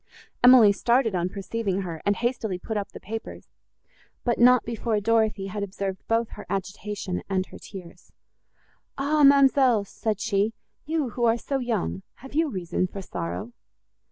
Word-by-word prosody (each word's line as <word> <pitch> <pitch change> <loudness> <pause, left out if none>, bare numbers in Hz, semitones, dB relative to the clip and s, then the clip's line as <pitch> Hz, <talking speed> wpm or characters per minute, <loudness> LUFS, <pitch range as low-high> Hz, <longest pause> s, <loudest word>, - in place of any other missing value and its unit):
Emily 245 -4 +8
started 235 +2 +2
on 180 0 0
perceiving 195 0 -3
her, 170 -4 -6
and 205 - +3
hastily 230 -4 -2
put 220 +4 -5
up 205 -1 -2
the - - -10
papers, 225 +3 -7 0.8
but 240 -2 0
not 250 0 +6
before 230 -1 -1
Dorothée 215 -2 +1
had 205 +2 -4
observed 195 -1 -4
both 230 0 +1
her - - -10
agitation 195 0 -4
and 190 -1 0
her - - -13
tears. 185 -4 -12 0.9
"Ah, 295 +2 +1
ma'amselle!" 270 -5 +5
said 215 0 -3
she, 210 +1 0 0.3
"you, 310 -4 0
who 240 +2 0
are 230 0 +3
so 275 +3 -2
young,—have 235 - -4
you 320 +1 +2
reason 185 -3 -2
for 195 +1 -8
sorrow?" 195 +7 -5
215 Hz, 155 wpm, -25 LUFS, 195-240 Hz, 0.9 s, Emily